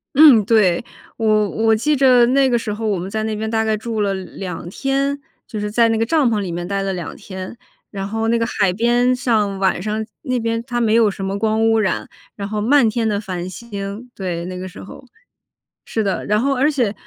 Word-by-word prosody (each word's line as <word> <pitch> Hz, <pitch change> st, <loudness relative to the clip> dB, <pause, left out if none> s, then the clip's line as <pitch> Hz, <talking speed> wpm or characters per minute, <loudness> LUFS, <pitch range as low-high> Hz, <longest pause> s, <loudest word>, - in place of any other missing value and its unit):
嗯， 275 Hz, -8 st, +8 dB
对， 210 Hz, -4 st, +3 dB, 0.3 s
我 215 Hz, -2 st, +2 dB
我 225 Hz, 0 st, +2 dB
记 300 Hz, +7 st, +1 dB
着 255 Hz, -3 st, +5 dB
那 265 Hz, +1 st, +3 dB
个 240 Hz, -, +2 dB
时 215 Hz, -2 st, -3 dB
候 220 Hz, +1 st, -3 dB
我 200 Hz, -3 st, +1 dB
们 180 Hz, +3 st, -5 dB
在 215 Hz, +1 st, -2 dB
那 220 Hz, -1 st, -2 dB
边 220 Hz, +1 st, -3 dB
大 220 Hz, 0 st, +1 dB
概 220 Hz, -1 st, +1 dB
住 220 Hz, -1 st, -3 dB
了 200 Hz, -1 st, +1 dB
2 185 Hz, -2 st, -6 dB
天， 275 Hz, +5 st, -1 dB, 0.3 s
就 215 Hz, -, -5 dB
是 210 Hz, 0 st, -2 dB
在 230 Hz, +1 st, +4 dB
那 225 Hz, -, +1 dB
个 225 Hz, -, +1 dB
帐 290 Hz, -2 st, +2 dB
篷 215 Hz, -, +1 dB
里 185 Hz, -4 st, -3 dB
面 175 Hz, +1 st, -4 dB
待 195 Hz, 0 st, -1 dB
了 195 Hz, -1 st, -2 dB
2 175 Hz, -4 st, -6 dB
天。 190 Hz, +3 st, -8 dB, 0.3 s
然 195 Hz, -1 st, -5 dB
后 225 Hz, +1 st, -2 dB
那 235 Hz, +1 st, +2 dB
个 230 Hz, -, 0 dB
海 200 Hz, -5 st, +1 dB
边 240 Hz, +4 st, +2 dB
上 215 Hz, -6 st, 0 dB
晚 190 Hz, -2 st, +1 dB
上 215 Hz, +1 st, -2 dB, 0.2 s
那 255 Hz, -3 st, -1 dB
边 230 Hz, 0 st, -1 dB
它 240 Hz, -1 st, -1 dB
没 220 Hz, -1 st, +2 dB
有 225 Hz, -2 st, +5 dB
什 195 Hz, 0 st, -6 dB
么 195 Hz, +1 st, -2 dB
光 220 Hz, 0 st, +2 dB
污 225 Hz, 0 st, +3 dB
染， 190 Hz, -4 st, -1 dB, 0.3 s
然 200 Hz, -1 st, -5 dB
后 210 Hz, 0 st, -3 dB
漫 245 Hz, 0 st, +4 dB
天 225 Hz, 0 st, -1 dB
的 205 Hz, -1 st, 0 dB
繁 185 Hz, -2 st, -5 dB
星， 205 Hz, +2 st, -7 dB
对， 175 Hz, -3 st, -4 dB
那 180 Hz, 0 st, -6 dB
个 185 Hz, +1 st, -6 dB
时 185 Hz, -, -11 dB
候。 260 Hz, -, -12 dB, 0.8 s
是 220 Hz, -, 0 dB
的， 195 Hz, -2 st, -2 dB
然 210 Hz, +1 st, +2 dB
后 275 Hz, +1 st, +1 dB
而 275 Hz, +4 st, +3 dB
且 240 Hz, -8 st, 0 dB
220 Hz, 245 characters per minute, -19 LUFS, 195-235 Hz, 0.8 s, 嗯